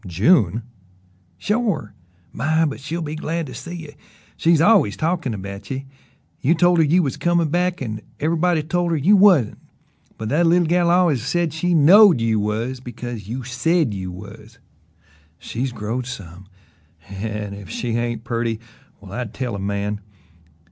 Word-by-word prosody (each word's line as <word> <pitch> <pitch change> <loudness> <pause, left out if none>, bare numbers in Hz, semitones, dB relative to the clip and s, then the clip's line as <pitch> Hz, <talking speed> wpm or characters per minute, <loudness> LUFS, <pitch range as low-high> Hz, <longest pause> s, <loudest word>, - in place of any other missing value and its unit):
"June!" 110 - +3 0.7
"Shore! 210 - -1 0.4
My, 160 +6 +1
but 145 - -3
she'll 160 +5 -4
be 150 0 -5
glad 165 +1 -3
to 130 - -9
see 135 +9 -7
ye! 160 -4 -8 0.4
She's 165 -1 +3
always 165 - +4
talkin' 160 -7 -1
about 100 0 -8
ye. 135 +1 -4 0.5
You 155 +6 +2
told 175 0 +4
her - - +6
you 170 +4 +3
was 135 - -2
comin' 170 -2 +1
back 180 -1 0
an' 110 -3 -5 0.2
ever'body 165 +1 +1
told 175 +3 -1
her 165 - +1
you 180 +9 +4
wasn't: 185 - +4 0.6
but 110 - -5
that 165 +7 +3
leetle 175 +1 +4
gal 175 +1 +2
al'ays 170 -7 +3
said 165 +3 0
she 175 +2 0
KNOWED 175 - +7
you 115 -1 +1
was, 110 +5 -2
because 120 -4 -7
you 125 +4 -5
SAID 130 +2 0
you 95 -2 -5
was. 105 +4 -12 0.8
She's 130 +8 -4
growed 120 +2 -4
some 95 -6 -9 0.6
an' 105 +1 -5
if 100 -4 -10
she 120 - -4
ain't 115 -1 -2
purty, 115 -2 -2 0.4
well 95 -1 -12
I'd 120 0 -5
tell 125 -4 -3
a 100 - -4
man! 100 +1 -3
130 Hz, 160 wpm, -21 LUFS, 110-170 Hz, 0.8 s, KNOWED